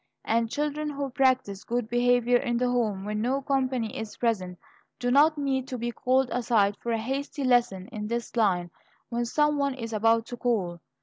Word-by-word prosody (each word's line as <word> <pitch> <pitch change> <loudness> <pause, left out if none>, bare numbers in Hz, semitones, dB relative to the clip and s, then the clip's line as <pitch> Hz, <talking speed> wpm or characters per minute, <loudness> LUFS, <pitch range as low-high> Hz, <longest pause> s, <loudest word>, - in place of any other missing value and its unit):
And 230 0 +1
children 300 +3 -2
who 280 -2 -4
practise 255 -7 +1
good 240 -1 -2
behavior 245 +1 +3
in 240 0 -1
the 250 +1 +1
home 220 -6 0
when 210 0 -2
no 260 +4 +1
company 260 -4 -1
is 220 -1 -6
present, 190 -7 -1 0.4
do 245 0 -1
not 300 +4 +5
need 265 -2 -1
to 255 - -4
be 240 0 -2
called 255 +2 +1
aside 220 -5 +2
for 235 - -3
a 230 - +1
hasty 275 +5 -3
lesson 235 -7 +2
in 210 -1 -5
this 235 +2 -4
line 180 -6 +1 0.4
when 240 0 -1
some 295 +4 +1
one 280 -1 0
is 230 -3 -6
about 225 +1 +3
to 245 - -7
call. 195 -9 -1
240 Hz, 190 wpm, -27 LUFS, 220-265 Hz, 0.4 s, not